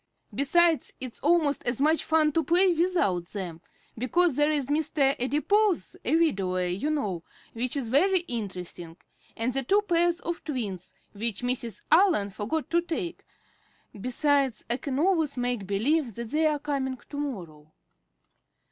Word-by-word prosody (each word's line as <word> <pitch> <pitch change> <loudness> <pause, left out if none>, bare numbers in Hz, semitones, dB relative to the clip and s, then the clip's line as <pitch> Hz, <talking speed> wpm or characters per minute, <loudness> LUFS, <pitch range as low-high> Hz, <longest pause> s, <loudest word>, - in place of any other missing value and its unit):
Besides, 330 +3 +3
it's 255 -3 -7
almost 310 -2 +2
as 240 0 -1
much 310 +3 +3
fun 315 -1 +3
to 325 +2 +1
play 355 +4 +4
without 330 - +1
them, 175 -4 -6 0.3
because 290 +6 +2
there 295 +2 +3
is 295 -3 0
Mr. 285 -1 +1
Adipose, 375 +9 +1
a - - +2
widower, 190 - +1
you 185 +11 -2
know, 205 - -2 0.3
which 240 +3 -2
is 250 -5 -3
very 365 +8 +3
interesting, 185 - -6 0.4
and 230 +3 -1
the 270 - +1
two 400 +11 +2
pairs 345 -2 +2
of 340 0 -4
twins, 210 - -5 0.2
which 220 +2 -3
Mrs. 245 -4 -2
Allen 330 - +4
forgot 225 +10 -3
to 340 0 +3
take. 345 +1 -4 0.7
Besides, 265 +4 0
I 240 - +1
can 275 -1 -4
always 320 -4 +1
make 245 -5 -1
believe 235 +5 0
that 235 -1 -6
they 310 +1 +3
are 300 -1 +1
coming 275 -3 -2
to 285 - -8
morrow." 170 - -6
275 Hz, 150 wpm, -27 LUFS, 225-320 Hz, 0.7 s, play